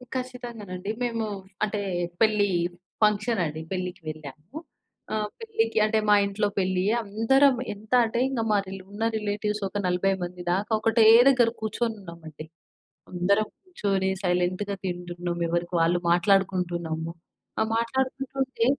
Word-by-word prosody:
ఖచ్చితంగానండి. 235 -7 -5
మేము 230 -2 -1 0.4
అంటే 210 -1 -1 0.4
పెళ్లి 210 -2 +4 0.5
ఫంక్షన్ 210 +1 +2
అండి. 155 0 -4
పెళ్లికి 180 -1 -3
వెళ్ళాము. 155 - -9 0.6
ఆహ్, 210 -1 -1
పెళ్లికి 450 - -1
అంటే 220 0 +2
మా 210 - +8
ఇంట్లో 200 +1 0
పెళ్లి. 185 -1 +1 0.2
అందరం 255 +7 +4 0.2
ఎంత 210 +1 -16
అంటే 230 +1 -2
ఇంగ 260 -4 -1
మా 210 - +4
రి 190 - -7 0.2
ఉన్న 210 +2 -4
రిలేటివ్స్ 210 0 -2
ఒక 205 - -5
40 180 +2 +2
మంది 180 0 -6
దాకా 200 +4 -2
ఒకటే 225 +1 +4 0.2
దగ్గర 245 -4 +4
కూర్చొనున్నామండి. 190 -9 -4 0.7
అందరం 200 +4 +2 0.2
కూర్చొని 200 - -1
సైలెంట్‌గా 180 +3 0
తింటున్నాం. 175 -1 -4
ఎవరికి 175 +1 -1
వాళ్ళు 175 +2 +3
మాట్లాడుకుంటున్నాము. 175 -3 +1 0.5
ఆ! - - +3 0.2
మాట్లాడుకుంటుంటే 265 +1 -1
205 Hz, 120 wpm, -26 LUFS, 180-225 Hz, 0.7 s, మా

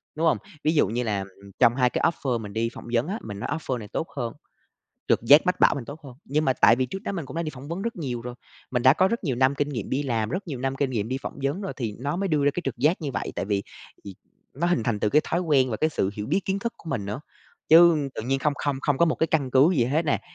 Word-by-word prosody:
Đúng 160 +2 +1
không? - - +3 0.3
Ví 155 - +3
dụ 145 - +4
như 120 +4 -2
là, 105 -3 -1
ừm, 95 - -5
ừm, 100 - -14
trong 120 -2 +5
hai 125 -2 +3
cái - - -2
offer 130 -7 0
mình 100 -2 -8
đi 115 +1 0
phỏng - - -10
vấn 120 +5 +2
á, 205 +5 -3
mình 100 -2 -7
nói 120 - -4
offer 135 -5 -2
này 105 -3 -8
tốt 160 - -3
hơn, 120 -3 -2 0.8
trực - - +3
giác 145 +9 +6
mách 180 - 0
bảo - - +5
mình 135 - -5
tốt 145 +6 -9
hơn. 130 -3 -10
Nhưng 150 +3 0
mà 130 - +3
tại 115 -2 +5
vì 130 0 0
trước 195 +10 -7
đó 225 - -3
mình 170 -7 -4
cũng - - -9
đã 170 - 0
đi 155 - -3
phỏng 135 +2 -10
vấn 170 +4 -4
rất 230 -2 -3
nhiều 125 -7 -4
rồi, 125 0 -6 0.4
mình 125 -2 0
đã 130 +1 +7
có 185 +5 +3
rất 230 -3 -3
nhiều 130 -5 -1
năm 130 +2 +3
kinh 145 +1 -1
nghiệm 120 -8 -5
đi 135 +2 0
làm, 115 -6 -1
rất 190 +8 -3
nhiều 140 -5 -4
năm 135 +1 -2
kinh 135 -1 0
nghiệm 110 -3 -2
đi 130 +1 -2
phỏng - - -6
vấn 145 +8 -1
rồi 195 - -4
thì 115 -6 -3
nó 140 +6 -2
mới 195 +1 -1
đưa 150 -4 +1
ra 145 - +4
cái 180 - -2
trực 135 - -3
giác 150 +9 +2
như 145 - -2
vậy. - - -3
Tại - - -1
vì 100 0 -1 0.4
vì 100 -2 -8 0.4
nó 170 +5 -1
hình 175 -9 +1
thành 110 -2 -1
từ 105 - +2
cái 150 +8 +3
thói 170 - -1
quen 140 -7 +2
và 110 - -1
cái 155 +6 +1
sự 95 -9 0
hiểu 105 0 -5
biết 195 - +1
kiến 195 +1 -1
thức 235 +3 -3
của 165 - -9
mình 120 -7 -2
nữa, 105 +8 -4 0.5
chứ 160 -3 +6
tự - - -4
nhiên 135 +4 0
không 150 +1 +1
không 145 -2 0
không 145 -2 +1
có - - +6
một 160 - +1
cái 160 - +1
căn 145 -5 0
cứ 135 +6 +5
gì 120 - +3
hết 150 +7 0
nè. 145 - +1
135 Hz, 320 wpm, -25 LUFS, 120-160 Hz, 0.8 s, đã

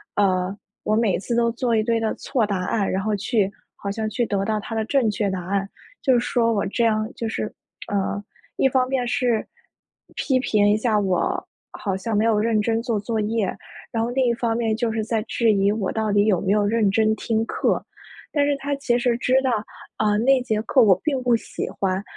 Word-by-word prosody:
呃， 185 -2 +1 0.3
我 215 - +1
每 225 -4 +2
次 235 - -4
都 235 0 +3
做 240 -1 -1
一 220 - +3
堆 230 +1 +1
的 225 -1 0
错 245 -6 0
答 195 -3 -2
案， 200 +1 0
然 190 - 0
后 215 +1 0
去 205 0 +1 0.3
好 200 - -5
像 220 +2 -2
去 235 +3 0
得 200 -3 -1
到 215 +1 0
他 225 +2 -6
的 220 - 0
正 245 0 +2
确 205 0 -1
答 185 -2 -4
案。 195 +1 -1 0.3
就 265 - +3
是 240 - +4
说 235 -1 +1
我 205 -3 0
这 235 +4 -1
样 215 -1 +1
就 230 - -3
是， 215 -1 -3 0.3
呃 200 0 -1 0.4
一 270 - +3
方 255 -1 +2
面 260 -2 0
是 240 -2 0 0.7
批 260 -2 +1
评 210 -5 +2
一 205 - +4
下 215 -1 +1
我， 185 -3 0 0.2
好 195 -3 -3
像 210 +2 -2
没 215 - +2
有 220 -2 +3
认 220 0 +2
真 225 +2 +1
做 230 -4 -1
作 225 +1 -2
业， 210 -2 -1 0.4
然 225 -1 0
后 235 - -1
另 260 +1 +1
一 240 - +3
方 230 -1 -1
面 225 -2 0
就 230 0 -1
是 220 -1 -2
在 225 -1 0
质 230 0 +1
疑 200 0 +3
我 210 -3 -1
到 220 -1 -1
底 205 0 +3
有 195 -5 +2
没 195 - 0
有 210 -1 +2
认 215 0 +2
真 220 +2 +2
听 225 +1 -1
课。 - - 0 0.5
但 290 -2 +3
是 290 - +2
他 280 +1 -3
其 240 -3 +1
实 245 -1 +1
知 250 +1 +1
道， 260 - +1 0.5
呃， 210 -1 +2
那 260 +3 +4
节 220 -4 -1
课 255 +3 +3
我 190 -5 +5
并 275 -4 0
不 245 -1 +3
喜 230 - -4
欢， 190 0 -2
220 Hz, 245 characters per minute, -23 LUFS, 205-235 Hz, 0.7 s, 我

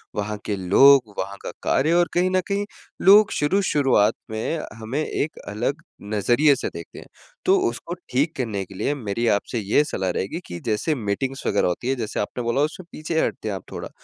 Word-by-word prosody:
वहाँ 105 0 -2
के 105 - -1
लोग, 115 +5 +5
वहाँ 100 0 -4
का - - -5
कार्य 155 +5 +2
और 175 -1 +4
कहीं 180 +1 +2
न 185 0 +2
कहीं 200 0 -1 0.4
लोग 205 +2 +7
शुरू 170 +7 +1
शुरुआत 130 - +3 0.2
में 110 +9 -2 0.2
हमें 130 +8 -2
एक 155 - -3
अलग 120 +10 -2 0.2
नज़रिए 120 +8 +3
से - - -3
देखते - - -10
हैं। - - -13 0.4
तो 380 +1 +5
उसको 175 - -6 0.2
ठीक 140 +6 0
करने 110 -6 -2
के 95 - -13
लिए 140 - 0
मेरी 115 -1 -2
आपसे 110 +2 0
ये 105 +8 +2
सलाह 95 -9 -2
रहेगी 100 - -2
कि 85 - -7
जैसे 115 +8 0
मीटिंग्स 130 +4 -3
वग़ैरह 100 - +2
होती 90 +8 -3
है 135 - +2
जैसे, 115 -3 -4
आपने 120 +4 -3
बोला 120 +4 +1
उसमें 160 +4 -2
पीछे 160 +1 -2
हटते - - -4
हैं 100 - -2
आप - - -7
थोड़ा। - - -6
125 Hz, 200 wpm, -23 LUFS, 105-155 Hz, 0.4 s, लोग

